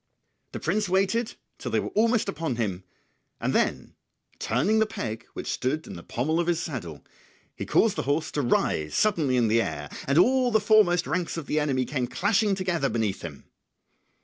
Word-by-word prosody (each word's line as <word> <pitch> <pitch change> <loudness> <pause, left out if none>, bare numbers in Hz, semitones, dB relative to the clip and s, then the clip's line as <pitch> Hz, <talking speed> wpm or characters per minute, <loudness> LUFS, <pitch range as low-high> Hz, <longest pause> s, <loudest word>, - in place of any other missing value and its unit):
The - - -4
prince 200 +4 0
waited 195 +5 +1 0.2
till - - -4
they - - +1
were - - -3
almost 230 +1 +2
upon 155 -4 -2
him, 100 -6 -2 0.6
then - - 0 0.5
turning 170 - +1
the 220 - +3
peg 110 - -5
which - - -6
stood 150 +5 -2
in - - -8
the 85 - -8
pommel 150 - -1
of 175 - 0
his 170 -2 +1
saddle 110 - -6 0.5
he - - -6
caused 215 -2 +3
the - - +1
horse 155 +3 0
to 145 - -1
rise 80 - 0
suddenly 155 -12 +2
in 120 -2 +3
the 115 +2 +3
air, - - -4 0.2
and 140 +2 +2
all 255 +7 +4
the 220 -2 +3
foremost 205 -5 +4
ranks 180 -2 -2
of 165 - -5
the 155 - 0
enemy 135 -4 0
came 130 -1 -2
clashing 200 - +1
together 175 -7 0
beneath 110 -4 -1
him. 75 -5 -8
160 Hz, 185 wpm, -26 LUFS, 125-200 Hz, 0.6 s, all